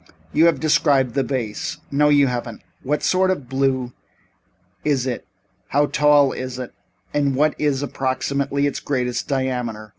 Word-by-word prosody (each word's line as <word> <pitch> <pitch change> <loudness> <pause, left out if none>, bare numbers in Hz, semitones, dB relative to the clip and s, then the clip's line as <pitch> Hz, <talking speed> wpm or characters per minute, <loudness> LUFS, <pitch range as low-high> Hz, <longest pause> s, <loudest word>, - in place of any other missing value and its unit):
You 160 +2 +5
have 170 - +2
described 140 -5 +2
the 135 - +1
vase 125 -6 -3
no 150 +1 +3
you 145 -1 +5
haven't. 120 -3 -4 0.2
What 150 +3 -1
sort 185 0 +2
of 145 -9 -2
blue 130 -1 0 0.9
is 140 -4 +1
it, 125 -3 -4 0.4
how 145 +1 +2
tall 145 -2 +4
is 130 -1 -5
it 125 -2 -6 0.4
and 140 -2 +1
what 150 +3 +3
is, 145 -2 0
approximately, 140 +1 -1
its 140 - -1
greatest 125 -3 -2
diameter? 125 -5 -2
135 Hz, 150 wpm, -21 LUFS, 125-145 Hz, 0.9 s, You